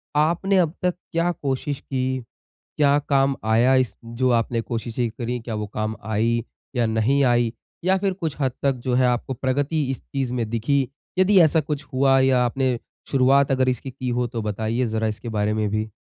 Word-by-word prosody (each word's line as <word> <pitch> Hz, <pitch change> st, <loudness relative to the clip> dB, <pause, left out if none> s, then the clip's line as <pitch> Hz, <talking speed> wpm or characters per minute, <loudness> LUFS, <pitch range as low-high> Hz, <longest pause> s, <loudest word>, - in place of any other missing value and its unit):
आपने 170 Hz, +6 st, +2 dB
अब 165 Hz, -4 st, +2 dB
तक 180 Hz, -1 st, +1 dB, 0.2 s
क्या 170 Hz, +1 st, +1 dB
कोशिश 140 Hz, -2 st, -3 dB
की? 130 Hz, -1 st, -2 dB, 0.5 s
क्या 145 Hz, -1 st, +4 dB
काम 135 Hz, -1 st, +3 dB
आया 115 Hz, +4 st, +4 dB
इस 130 Hz, -3 st, +1 dB
जो 115 Hz, +3 st, 0 dB
आपने 115 Hz, 0 st, +1 dB
कोशिश 115 Hz, 0 st, -5 dB, 0.2 s
करी 125 Hz, 0 st, -2 dB
क्या 115 Hz, -1 st, -5 dB
वो 105 Hz, 0 st, -3 dB
काम 110 Hz, +1 st, -2 dB
आई 115 Hz, +2 st, +1 dB, 0.3 s
या 120 Hz, -1 st, +2 dB
नहीं 110 Hz, +6 st, +2 dB
आई? 120 Hz, -2 st, +2 dB, 0.3 s
या 190 Hz, +1 st, +4 dB
फिर 195 Hz, 0 st, 0 dB
कुछ 165 Hz, -6 st, -4 dB
हद 130 Hz, -2 st, +2 dB
तक 140 Hz, -1 st, +2 dB
जो 130 Hz, -, 0 dB
है 130 Hz, 0 st, +4 dB
आपको 125 Hz, +2 st, -1 dB
प्रगति 140 Hz, +5 st, 0 dB
इस 135 Hz, -, -5 dB
चीज़ 135 Hz, -3 st, -3 dB
में 115 Hz, -3 st, -2 dB
दिखी? 130 Hz, +4 st, +1 dB, 0.3 s
यदि 190 Hz, +1 st, +5 dB
ऐसा 160 Hz, 0 st, +4 dB
कुछ 150 Hz, -1 st, -4 dB
हुआ 135 Hz, 0 st, +4 dB
या 130 Hz, -1 st, +4 dB
आपने 130 Hz, 0 st, 0 dB, 0.3 s
शुरुआत 135 Hz, +1 st, +4 dB
अगर 130 Hz, -1 st, +3 dB
इसकी 130 Hz, +1 st, -3 dB
की 130 Hz, 0 st, -4 dB
हो 120 Hz, 0 st, 0 dB
तो 120 Hz, -1 st, -4 dB
बताइए 110 Hz, +4 st, -1 dB
ज़रा 110 Hz, -1 st, -1 dB
इसके 110 Hz, +2 st, -5 dB
बारे 105 Hz, -1 st, 0 dB
में 110 Hz, -1 st, 0 dB
भी? 110 Hz, +1 st, -2 dB
130 Hz, 195 wpm, -23 LUFS, 115-140 Hz, 0.5 s, यदि